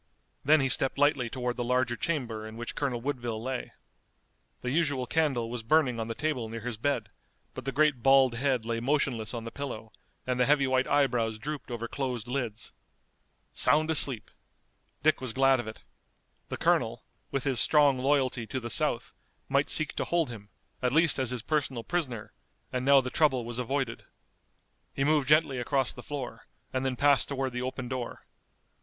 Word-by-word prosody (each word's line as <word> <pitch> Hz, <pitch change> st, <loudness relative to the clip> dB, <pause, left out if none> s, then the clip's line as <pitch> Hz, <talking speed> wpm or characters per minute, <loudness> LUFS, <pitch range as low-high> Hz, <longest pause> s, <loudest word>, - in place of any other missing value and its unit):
Then 155 Hz, +1 st, +5 dB
he 135 Hz, -, +2 dB
stepped 135 Hz, +2 st, +3 dB
lightly 140 Hz, -4 st, +2 dB
toward 125 Hz, 0 st, -3 dB
the 120 Hz, -, -1 dB
larger 125 Hz, 0 st, +1 dB
chamber 120 Hz, -7 st, -3 dB
in 110 Hz, +1 st, -10 dB
which 120 Hz, 0 st, -5 dB
Colonel 130 Hz, -5 st, -2 dB
Woodville 120 Hz, -4 st, -3 dB
lay. 130 Hz, +2 st, -4 dB, 0.9 s
The 125 Hz, -, -3 dB
usual 145 Hz, -4 st, 0 dB
candle 135 Hz, -5 st, 0 dB
was 120 Hz, 0 st, -4 dB
burning 125 Hz, 0 st, +2 dB
on 110 Hz, -, -3 dB
the 115 Hz, -, -4 dB
table 130 Hz, -7 st, -2 dB
near 115 Hz, 0 st, -6 dB
his 120 Hz, +1 st, -4 dB
bed, 115 Hz, -4 st, -1 dB, 0.4 s
but -, -, -8 dB
the 135 Hz, -, -1 dB
great 145 Hz, -3 st, +2 dB
bald 135 Hz, -1 st, +5 dB
head 125 Hz, -1 st, 0 dB
lay 115 Hz, 0 st, -2 dB
motionless 125 Hz, -4 st, 0 dB
on 115 Hz, -, -5 dB
the 115 Hz, -, -7 dB
pillow, 120 Hz, -6 st, -6 dB, 0.3 s
and 125 Hz, -1 st, -1 dB
the 125 Hz, -, +3 dB
heavy 145 Hz, -1 st, +4 dB
white 130 Hz, 0 st, +1 dB
eyebrows 120 Hz, -6 st, +1 dB
drooped 145 Hz, +5 st, -6 dB
over 115 Hz, -1 st, -4 dB
closed 125 Hz, -3 st, -4 dB
lids. 120 Hz, -5 st, -4 dB, 0.8 s
Sound 155 Hz, +2 st, +3 dB
asleep! 135 Hz, -7 st, +2 dB, 0.7 s
Dick 155 Hz, -2 st, +3 dB
was 130 Hz, -3 st, -3 dB
glad 135 Hz, 0 st, +4 dB
of 120 Hz, -, -5 dB
it. 110 Hz, -, -9 dB, 0.7 s
The -, -, -4 dB
colonel, -, -, +1 dB, 0.3 s
with 135 Hz, -, -2 dB
his 135 Hz, -4 st, +1 dB
strong 145 Hz, -2 st, +5 dB
loyalty 130 Hz, -4 st, +1 dB
to 130 Hz, -, -3 dB
the 120 Hz, -1 st, -4 dB
South, -, -, +2 dB, 0.4 s
might 140 Hz, +1 st, +2 dB
seek 155 Hz, -1 st, +3 dB
to -, -, -1 dB
hold 170 Hz, -6 st, 0 dB
him, 105 Hz, -3 st, -10 dB, 0.3 s
at 125 Hz, -1 st, +1 dB
least 160 Hz, -2 st, +3 dB
as 130 Hz, -3 st, 0 dB
his 125 Hz, -3 st, -3 dB
personal 140 Hz, -6 st, -1 dB
prisoner, 130 Hz, -11 st, -3 dB, 0.4 s
and 125 Hz, 0 st, -1 dB
now 140 Hz, 0 st, +6 dB
the 125 Hz, -1 st, -5 dB
trouble 135 Hz, -7 st, +2 dB
was 120 Hz, +1 st, -5 dB
avoided. 125 Hz, -1 st, -2 dB, 0.9 s
He 135 Hz, -, 0 dB
moved 150 Hz, -2 st, +2 dB
gently 150 Hz, -3 st, +3 dB
across 135 Hz, +1 st, 0 dB
the 125 Hz, -, -10 dB
floor, 130 Hz, -5 st, -7 dB, 0.3 s
and 130 Hz, 0 st, -1 dB
then 130 Hz, -1 st, -1 dB
passed 140 Hz, +1 st, +3 dB
toward 135 Hz, -2 st, -3 dB
the 125 Hz, -, -3 dB
open 130 Hz, 0 st, -4 dB
door. 125 Hz, -1 st, -5 dB
130 Hz, 185 wpm, -28 LUFS, 120-140 Hz, 0.9 s, now